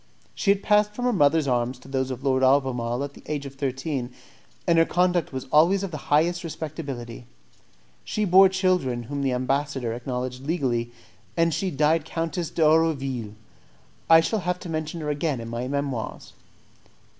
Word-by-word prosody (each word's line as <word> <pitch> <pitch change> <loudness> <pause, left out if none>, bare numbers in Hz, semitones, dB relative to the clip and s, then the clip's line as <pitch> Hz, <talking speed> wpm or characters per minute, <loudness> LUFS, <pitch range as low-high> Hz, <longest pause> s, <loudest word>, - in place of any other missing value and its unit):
She - - -2
had 200 0 +3
passed 210 0 +3
from 245 - -3
her 250 - +2
mother's 150 -3 +3
arms 125 0 0
to 125 - -16
those 130 -1 -1
of 130 0 -6
Lord 130 -2 +2
Albemarle 130 -2 +2
at 140 0 -6
the - - -14
age 145 -2 -3
of 135 - -8
thirteen, 135 -1 -3 0.5
and 170 -1 +4
her - - +7
conduct 175 -1 +1
was 130 -1 -5
always 175 +6 +4
of 195 - -4
the 155 - -4
highest 170 +4 +2
respectability. 140 -8 -6 0.8
She 215 - -1
bore 190 +1 +7
children 180 -11 0
whom 140 +4 -4
the 135 -1 +1
ambassador 130 -1 -1
acknowledged 125 +1 -4
legally, 130 -7 -1 0.5
and 165 -1 +3
she 190 +5 -1
died 155 +1 +2
Countess 165 0 -3
d'Erouville. 140 -8 +1 0.7
I 165 0 +8
shall 215 +6 -1
have 180 -1 -1
to 175 - -7
mention 155 +1 -3
her 150 -1 -2
again 145 -2 -1
in 115 0 -7
my 120 +2 -3
Memoirs. 140 -4 -4
145 Hz, 170 wpm, -25 LUFS, 130-165 Hz, 0.8 s, I